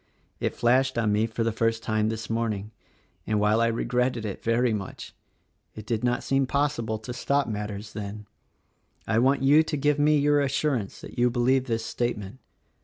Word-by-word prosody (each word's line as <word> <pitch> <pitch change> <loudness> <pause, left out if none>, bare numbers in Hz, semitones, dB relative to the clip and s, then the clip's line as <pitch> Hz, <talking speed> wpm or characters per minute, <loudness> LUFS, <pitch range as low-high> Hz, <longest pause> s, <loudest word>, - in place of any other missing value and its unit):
It - - -2
flashed 130 +2 +2
on 110 -3 +2
me 105 +2 +2
for 115 0 -2
the 115 - +1
first 115 +1 0
time 110 0 0
this 110 -1 -4
morning; 110 -2 -2 0.6
and, 105 -1 +1
while 105 +2 +3
I 115 - +3
regretted 120 0 0
it 100 - -5
very 115 +1 +2
much, 100 -3 -6 0.6
it 110 - -8
did 115 0 -2
not 125 0 0
seem 135 -1 +1
possible 140 -6 0
to 110 +3 -7
stop 140 +3 0
matters 105 -1 -5
then. 105 0 -6 0.8
I 110 0 +1
want 135 +2 +2
you 145 +3 +6
to 160 -1 -2
give 145 +1 +1
me 150 +1 +4
your 145 0 +3
assurance 135 -5 -1
that - - -9
you 125 0 +4
believe 125 +2 +2
this 115 -3 -2
statement. 110 -1 -3
115 Hz, 180 wpm, -26 LUFS, 110-130 Hz, 0.8 s, you